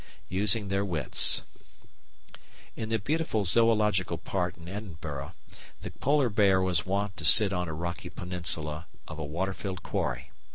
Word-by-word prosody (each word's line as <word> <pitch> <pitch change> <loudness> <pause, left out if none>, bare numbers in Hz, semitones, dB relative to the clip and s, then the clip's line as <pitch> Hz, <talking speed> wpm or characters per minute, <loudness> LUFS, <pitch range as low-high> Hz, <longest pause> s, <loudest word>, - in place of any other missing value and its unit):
Using 100 +2 +1
their 100 0 0
Wits 85 -8 +3 1.3
In 110 - -5
the 115 - +1
beautiful 125 -2 -1
Zoological 105 -4 +2
Park 90 +1 -3
in 85 0 -13
Edinburgh 80 -8 -7 0.5
the - - -7
Polar 140 -2 +1
Bear 100 -3 +3
was 95 -3 0
wont 100 +1 -1
to 80 - -6
sit 100 +5 +7
on 90 -1 -2
a 80 - -5
rocky 85 +2 -5
peninsula 85 -3 -2 0.2
of 80 0 -8
a - - -3
water 85 +7 -3
filled 95 -2 -6
quarry. - - -3
95 Hz, 150 wpm, -28 LUFS, 85-105 Hz, 1.3 s, sit